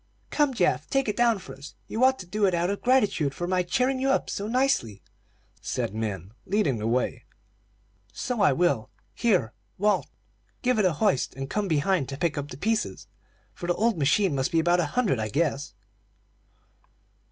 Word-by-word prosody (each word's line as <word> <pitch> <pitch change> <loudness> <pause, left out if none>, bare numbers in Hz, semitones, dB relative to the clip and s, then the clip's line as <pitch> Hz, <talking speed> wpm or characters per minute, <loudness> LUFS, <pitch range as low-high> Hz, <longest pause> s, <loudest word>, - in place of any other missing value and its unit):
"Come, 290 -3 +2
Geoff, - - +1
take 270 -2 +1
it 210 - -1
down 235 -2 +3
for 185 - -10
us. 140 +2 -11
You 230 - -1
ought 260 0 +5
to 185 - -8
do 205 +3 +1
it 185 - +1
out 175 +2 0
of 200 - -4
gratitude 210 - +2
for 175 - -3
my 180 +1 +1
cheering 255 +9 0
you 270 +1 +1
up 270 - +1
so 200 - -3
nicely," 230 - 0 0.6
said - - -3
Min, 100 -4 -4 0.2
leading 180 - +1
the 110 - -2
way. 125 +2 -1 0.9
"So 245 -4 -3
I 190 - +5
will. 135 -8 +1 0.2
Here, 185 - +1 0.2
Walt, 210 +2 +1 0.6
give 250 -3 +2
it 205 - +3
a 180 - +3
hoist, 150 - 0
and 135 0 -6
come 210 -1 -1
behind 160 -2 +1
to 135 - -5
pick 170 0 0
up 145 -1 -4
the 130 - -8
pieces, 220 +7 -1 0.5
for 175 - -7
the 175 - +1
old 230 0 +2
machine 160 +5 +2
must 130 -1 -1
be 165 - +3
about 175 +2 +3
a 170 - +1
hundred, 210 - +2
I 110 0 -2
guess." 145 +2 -1
180 Hz, 190 wpm, -26 LUFS, 140-220 Hz, 0.9 s, ought